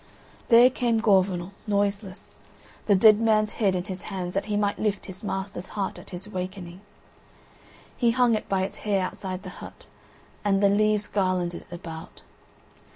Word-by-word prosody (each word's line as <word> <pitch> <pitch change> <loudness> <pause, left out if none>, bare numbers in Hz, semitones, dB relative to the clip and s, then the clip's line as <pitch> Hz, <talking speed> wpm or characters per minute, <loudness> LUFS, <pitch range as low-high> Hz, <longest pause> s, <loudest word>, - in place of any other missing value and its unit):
There 240 +2 +7
came 235 -3 +1
Gorvenal, 190 -4 +2 0.2
noiseless, 200 -1 -2 0.5
the 205 - +5
dead 210 +2 +7
man's 215 -2 +2
head 195 -3 +3
in 180 - -1
his 190 0 -7
hands 180 -3 -4
that 195 +1 -1
he 210 -1 -1
might 205 -1 0
lift 210 -2 -1
his 190 +2 -10
master's 190 -2 -4
heart 195 -2 -2
at - - -13
his 185 +1 -7
awakening. 185 -2 -6 1.1
He 240 - +2
hung 240 0 +3
it 215 - -2
by 190 -1 +1
its 190 - -5
hair 200 -3 0
outside 185 0 -6
the - - -7
hut, - - -11 0.6
and 200 -1 +2
the 200 - +6
leaves 210 +1 +2
garlanded 185 -4 -1
it 175 - -7
about. 165 -2 -9
200 Hz, 165 wpm, -26 LUFS, 185-210 Hz, 1.1 s, There